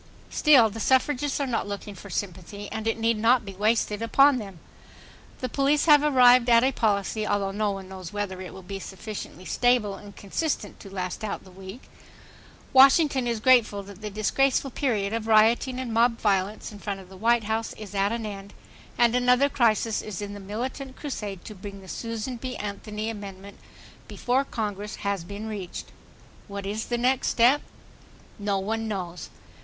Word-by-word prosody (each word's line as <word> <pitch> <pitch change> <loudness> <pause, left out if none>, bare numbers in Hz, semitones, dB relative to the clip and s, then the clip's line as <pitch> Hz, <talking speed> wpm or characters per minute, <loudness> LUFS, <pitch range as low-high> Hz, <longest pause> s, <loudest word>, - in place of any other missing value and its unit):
Still, 260 -8 +5
the 225 - -7
suffragists 270 +4 +1
are 280 - 0
not 235 -5 -2
looking 205 0 -6
for 200 +1 -11
sympathy, 195 +2 -5
and 220 0 -4
it 225 - 0
need 225 -1 +1
not 230 +1 +3
be 195 - -7
wasted 210 +1 +1
upon 275 +4 +5
them. 195 -5 -8 0.8
The 255 - -1
police 280 +3 +2
have 295 -3 +7
arrived 250 -4 +6
at 235 0 +6
a 265 - +3
policy, 215 -2 0
although 200 -1 0
no 210 +1 0
one 195 -1 -5
knows 185 -3 -8
whether 200 -3 -4
it 185 - -7
will 190 - -11
be 195 +2 -6
sufficiently 190 -1 -8
stable 245 -4 +2
and 200 0 -11
consistent 210 - -3
to 195 - -11
last 185 +1 -4
out 210 - -4
the 185 - -15
week.... 190 +6 -10 0.9
Washington 270 -1 +6
is 235 -2 -1
grateful 225 -4 +4
that 200 +1 -12
the 210 - -4
disgraceful 265 +6 +1
period 220 -7 -1
of 225 -1 -3
rioting 225 +4 +4
and 250 -3 -4
mob 230 +1 +3
violence 200 0 0
in 205 - -11
front 200 -1 -4
of 190 - -13
the 190 - -13
White 230 +4 +2
House 220 +2 -2
is 210 -2 -10
at 200 +1 +1
an 230 -1 -3
end, 200 -1 -8 0.4
and 235 -1 +4
another 250 +3 +4
crisis 225 -4 +1 0.2
in 205 -1 -5
the 205 - -8
militant 255 +7 -5
crusade 210 - -6
to 215 - -7
bring 200 0 -9
the 190 - -14
Susan 230 +4 -4
B. 255 +2 -5
Anthony 210 +2 -4
amendment 200 -2 -9 0.5
before 255 +2 0
Congress 210 -3 -4
has 200 -3 -1
been 200 +4 -7
reached. 200 -5 -6 0.6
What 200 -1 -6
is 210 +3 -3
the 240 - -1
next 250 +2 +1
step? 250 +5 +4 0.8
No 200 -1 0
one 220 +3 -2
knows. 180 -4 -5
215 Hz, 180 wpm, -26 LUFS, 200-245 Hz, 0.9 s, have